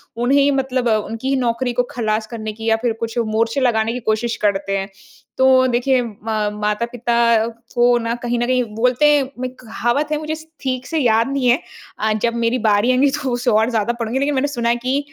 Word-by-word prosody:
उन्हें 245 Hz, +4 st, +2 dB
ही 280 Hz, 0 st, +4 dB
मतलब 260 Hz, -2 st, 0 dB
उनकी 225 Hz, +4 st, -1 dB
ही 275 Hz, -, +2 dB
नौकरी 240 Hz, +1 st, -1 dB
को 245 Hz, -, +1 dB
खलास 215 Hz, -2 st, -1 dB
करने 220 Hz, -2 st, -6 dB
की 225 Hz, +1 st, -9 dB
या 225 Hz, -, +4 dB
फिर 230 Hz, 0 st, -1 dB
कुछ 230 Hz, +1 st, -4 dB
मोर्चे 230 Hz, +4 st, 0 dB
लगाने 225 Hz, -2 st, +1 dB
की 250 Hz, -, -3 dB
कोशिश 220 Hz, +1 st, -1 dB
करते 195 Hz, -1 st, 0 dB
हैं। 195 Hz, +1 st, -4 dB, 0.5 s
तो 260 Hz, 0 st, +5 dB
देखिए 250 Hz, +1 st, +2 dB
म 225 Hz, -3 st, -8 dB, 0.5 s
माता-पिता 235 Hz, +1 st, +1 dB, 0.3 s
को 240 Hz, 0 st, +4 dB
ना 230 Hz, 0 st, -2 dB
कहीं 240 Hz, 0 st, -1 dB
न 240 Hz, -, +1 dB
कहीं 255 Hz, -1 st, +2 dB
बोलते 250 Hz, +5 st, +2 dB
हैं 285 Hz, -2 st, +3 dB, 0.2 s
मैं 255 Hz, 0 st, -2 dB
कहावत 240 Hz, +5 st, -1 dB
है 300 Hz, -, +1 dB
मुझे 310 Hz, 0 st, -3 dB
स 315 Hz, -, -12 dB, 0.2 s
ठीक 255 Hz, -2 st, -2 dB
से 320 Hz, -, -1 dB
याद 230 Hz, -2 st, +3 dB
नहीं 270 Hz, -3 st, 0 dB
है 245 Hz, +4 st, +4 dB, 0.4 s
अ, 220 Hz, 0 st, +1 dB
जब 230 Hz, +2 st, 0 dB
मेरी 235 Hz, +1 st, +1 dB
बारी 215 Hz, +2 st, +3 dB
आएँगी 265 Hz, +3 st, +3 dB
तो 265 Hz, -3 st, -2 dB
उसे 245 Hz, +1 st, 0 dB
और 220 Hz, +2 st, +3 dB
ज़्यादा 230 Hz, 0 st, 0 dB
पढ़ूँगी। 235 Hz, +2 st, -3 dB
लेकिन 280 Hz, +1 st, 0 dB
मैंने 275 Hz, +2 st, +1 dB
सुना 240 Hz, -4 st, -1 dB
है 235 Hz, -, +3 dB
कि 255 Hz, +3 st, -1 dB
240 Hz, 220 wpm, -19 LUFS, 225-255 Hz, 0.5 s, तो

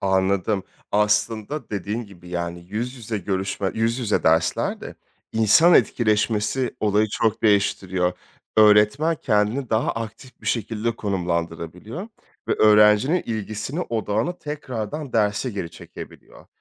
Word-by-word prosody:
Anladım. 95 Hz, +1 st, +1 dB, 0.3 s
Aslında 105 Hz, +6 st, 0 dB
dediğin 105 Hz, +3 st, -3 dB
gibi, 90 Hz, -4 st, -15 dB
yani, 85 Hz, 0 st, -4 dB
yüz 115 Hz, +5 st, -3 dB
yüze 115 Hz, -3 st, -4 dB
görüşme 95 Hz, +1 st, -2 dB
yüz 115 Hz, +2 st, 0 dB
yüze 115 Hz, -5 st, 0 dB
derslerde 80 Hz, +1 st, +1 dB, 0.4 s
insan 110 Hz, -, +5 dB
etkileşmesi 110 Hz, +2 st, +1 dB
olayı 105 Hz, 0 st, +2 dB
çok 110 Hz, 0 st, 0 dB
değiştiriyor. 95 Hz, -3 st, +2 dB, 0.4 s
Öğretmen 110 Hz, +10 st, +5 dB
kendini 105 Hz, +5 st, +1 dB
daha 110 Hz, +1 st, +1 dB
aktif 115 Hz, +3 st, -8 dB
bir -, -, -12 dB
şekilde 115 Hz, 0 st, -1 dB
konumlandırabiliyor 90 Hz, -, -3 dB, 0.4 s
ve -, -, +3 dB
öğrencinin 105 Hz, +9 st, +5 dB
ilgisini, 110 Hz, -, -4 dB
odağını 115 Hz, -, -2 dB
tekrardan 140 Hz, -2 st, -5 dB
derse 105 Hz, +3 st, +1 dB
geri 95 Hz, -6 st, -5 dB
çekebiliyor. -, -, -12 dB
105 Hz, 110 wpm, -23 LUFS, 100-115 Hz, 0.4 s, insan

